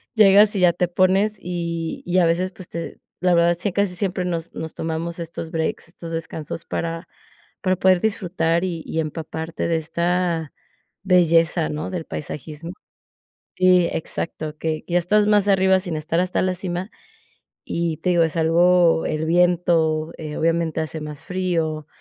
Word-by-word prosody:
Llegas 210 0 +6
y 195 - 0
ya 175 -2 +5
te 180 0 0
pones, 190 +4 +2
y 170 -3 -4
y 180 +1 0
a 175 - +4
veces 175 +3 +1
pues 185 -2 -12
te 170 0 -6 0.2
la 180 -1 +3
verdad 170 0 +4
sí 205 - -1
acá 200 +2 +1
sí, 180 -2 -7
siempre 185 0 -2
nos 170 -2 -3
nos 160 0 -6
tomamos 165 +1 -3
estos 165 -1 -6
breaks, 160 +1 -2
estos 165 -1 -9
descansos 160 -1 -5
para 165 +1 -4 0.5
para 185 -1 +2
poder 185 -1 +4
disfrutar 175 -5 0
y 170 -3 -4
y 160 - -3
empaparte 160 +1 -4
de 165 - +2
esta 170 0 -1 0.5
belleza, 170 -3 +3
¿no?, 150 +1 -4
del 180 -3 -3
paisajismo 155 +3 -7 0.8
Sí, 180 -2 +4
exacto, 155 -1 -4
que 155 -1 -2
que 175 - -6
ya 175 - +5
estás 210 +4 +2
más 205 -1 +3
arriba 190 -1 +4
sin 175 -4 -4
estar 165 +2 -1
hasta 180 0 0
la 185 - +1
cima. 180 +1 -4 0.8
Y 165 -2 -1
te 180 +2 0
digo, 170 -1 +3
es 160 0 -2
algo 170 +1 +4
el 155 0 -2
viento, 165 -2 +2
eh, 155 -2 -6
obviamente 165 -1 0
hace 160 0 -5
más 150 -1 -8
frío, 165 -5 -2
170 Hz, 170 wpm, -22 LUFS, 160-180 Hz, 0.8 s, Llegas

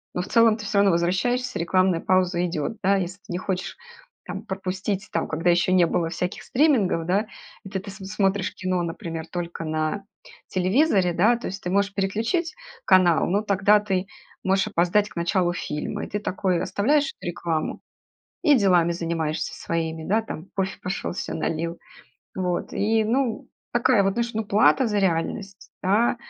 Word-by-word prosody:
но 180 - 0
в - - -6
целом 230 -2 +5
ты 215 - -8
всё 200 0 -1
равно 200 -2 +5
возвращаешься, 215 +10 0
рекламная 185 0 +2
пауза 185 -1 +2
идет, 165 +1 -2
да. 200 +1 +4
Если 180 +3 -5
ты 190 - -9
не - - -1
хочешь 185 -1 -3 0.5
там - - -5
пропустить, 190 +1 -3
там, - - 0
когда 165 +3 0
еще 175 +1 +2
не 180 -2 +5
было 165 -1 0
всяких 180 +2 -4
стримингов, 240 - +2
да, 185 +3 +2 0.4
и 195 - -9
ты 190 -1 -3
ты 200 +2 -9
смотришь 195 0 -1
кино, 185 -2 -1
например, 165 -1 -5
только 170 -1 -4
на 155 +5 -1 0.5
телевизоре, 185 - +2
да, 215 +8 +4
то - - -6
есть 195 +2 -6
ты 180 - -2
можешь 200 0 +1
переключить 225 - -1 0.3
канал, 180 -4 +5
но 200 +4 +1
тогда 200 0 +3
ты 195 -2 -1 0.4
можешь 190 0 +2
опоздать 185 +5 +2
к - - -17
началу 175 +1 +1
фильма. 150 -3 -4
И - - -11
ты 205 - -2
такой: 185 -3 -1
оставляешь 275 +10 +1
рекламу 170 -2 -3 0.6
и 300 -4 +6
делами 180 -5 +3
занимаешься 165 -2 -2
своими, 160 -1 -3
да, 215 +4 +2
там 175 -5 -7
кофе 190 0 -1
пошел 180 -1 -3
се - - -4
налил. 165 +1 -2 0.6
Вот 180 -2 -2
и, 220 +1 +1
ну, 240 +1 -1 0.2
такая 240 -3 +3
вот, 195 0 +1
знаешь, 235 0 -1
ну, 220 - -1
плата 215 +5 +4
за 210 -2 0
реальность, 195 +2 -2
да. 210 +6 +2
190 Hz, 170 wpm, -24 LUFS, 175-210 Hz, 0.6 s, и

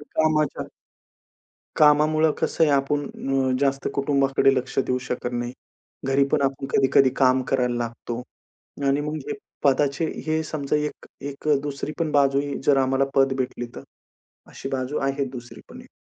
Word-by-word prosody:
कामाच्या 155 0 0 1.1
कामामुळं 155 +1 +4
कसं - - 0
आहे. 150 - +2
आपण 140 +1 +1 0.5
अ, - - +2
जास्त 140 -1 +1
कुटुंबाकडे 140 -1 +2
लक्ष 130 +1 -3
देऊ 125 -1 +1
शकत 125 0 -3
नाही. 120 0 -3 0.5
घरीपण 140 +1 +2
आपण 135 0 -1
कधी-कधी 135 0 +4
काम 130 -1 +4
करायला 125 -2 +1
लागतो. 120 0 -4 0.6
आणि 140 +1 +2
मग 150 +1 -3
हे 435 - -2 0.3
पदाचे 140 +3 +2 0.2
हे 160 0 +1
समजा 150 -1 -2
एक 150 0 -4 0.2
एक 140 +2 -7
दुसरी 145 +1 -4
पण 165 -2 0
बाजू 140 -1 +3
ही 145 -1 -4
जर 140 - +4
आम्हाला 135 0 +2
पद 135 0 +4
भेटली 125 -1 -3
तर. - - -7 0.6
अशी 135 - -8
बाजू 135 +2 -2
आहे 135 0 0
दुसरी 120 -2 -10
पण - - -11
एक. - - -17
140 Hz, 155 wpm, -24 LUFS, 130-150 Hz, 1.1 s, कामामुळं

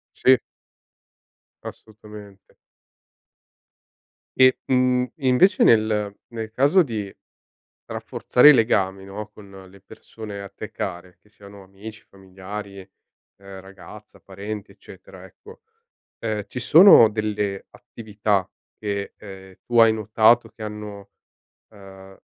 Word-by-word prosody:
Sì. 130 0 +4 1.3
Assolutamente. 105 -2 -14 1.8
E, 130 0 +4
mhmm, 125 -1 +1
invece 140 +7 +2
nel 105 -2 +2
nel 110 -2 -7
caso 145 +10 +3
di 110 - -6 0.7
rafforzare 125 +4 +2
i - - +8
legami, 95 -5 0
no, 100 +2 -8
con 100 -2 -16 0.2
le 95 +1 -19
persone 105 +1 -11
a 100 - -10
te - - -10
care, 90 +2 -7
che 105 - -30
siano 100 -1 -15
amici, 100 +3 -13
familiari, 100 +1 -10
ehm, 95 0 -17
ragazza, 95 0 -15
parenti, 100 +2 -8
eccetera, - - -15
ecco, - - -17 0.6
ehm, 110 -2 -4
ci 125 - -7
sono 145 - +7
delle 105 -2 -4
attività 105 -5 -4 0.3
che, 100 -1 -5
ehm, 95 -2 -13
tu 120 -1 0
hai 115 -1 +6
notato 110 +2 +2
che 110 0 -14
hanno, 105 -2 -9 0.6
ehm, 95 -1 -15
105 Hz, 110 wpm, -22 LUFS, 100-115 Hz, 1.8 s, i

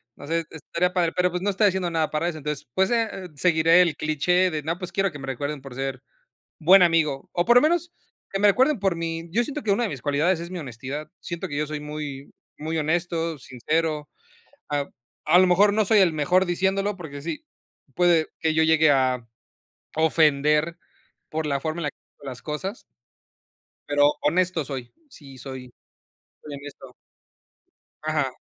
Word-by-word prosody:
No - - -11
sé, 165 0 -1
estaría 170 +3 -2
padre, 170 -3 +1
pero 180 0 +3
pues, 180 0 -3
no 205 - +1
estoy 205 +2 +3
haciendo 185 -2 0
nada 160 -2 0
para 155 +3 0
eso. 155 - -6
Entonces, 150 -1 -4
pues, 190 0 +2
eh, 220 -5 -1
seguiré 165 +2 +4
el 170 -4 +1
cliché 180 +4 +2
de: 155 -2 -3
"No, 165 +3 -2
pues, 180 - -6
quiero 195 -2 +1
que 145 - -9
me 135 - -8
recuerden 140 +2 -4
por 135 -2 -10
ser 135 -1 -4 0.6
buen 180 +4 +7
amigo". 155 -5 +2
O 175 - +1
por 240 +1 +5
lo 245 - +8
menos, 345 +2 +1 0.4
que 195 - -2
me 205 - +6
recuerden 260 +5 +3
por 190 -4 +1
mi 165 0 -4
Yo 235 +7 +2
siento, 295 +2 -5
que 210 - -1
una 240 +4 +1
de - - -1
mis 130 -4 -7
cualidades, 160 +5 +1
es 170 +1 -7
mi 185 - -5
honestidad. 135 +2 -6
Siento 170 -1 -5
que 145 - -5
yo 150 0 0
soy, 150 0 -5
muy 150 -2 -7 0.3
muy 160 +2 -3
honesto, 165 0 -1
sincero. 150 +4 -2 0.6
Ap 145 -1 -2 0.4
a 170 +3 +6
lo 185 - +6
mejor, 200 +3 +4
no 215 -1 +3
soy 215 +2 +4
el 175 -4 +4
mejor 180 +5 +2
diciéndolo, 195 +3 0
porque 145 -5 -8
sí, 295 - -5 0.5
puede 175 -3 +3
que 160 -1 +1
yo 160 - +4
llegue 160 -1 +4
a 130 -3 +1 0.7
ofender, 155 0 +3 0.5
por 155 0 -2
la 140 -2 -1
forma 155 +3 -3
en - - -4
la 145 - -1
que - - -54 0.2
digo 145 - -16
las 125 -2 -8
cosas. 190 +8 -4 1.1
Pero, 145 0 +4
honesto 170 0 +1
soy. 130 -4 -6 0.2
Sí, 135 - -14
soy 130 -1 -8 0.7
soy 150 - -8
honesto. 140 -2 -10 1.1
Ajá. 150 -4 0
160 Hz, 190 wpm, -24 LUFS, 145-180 Hz, 1.1 s, lo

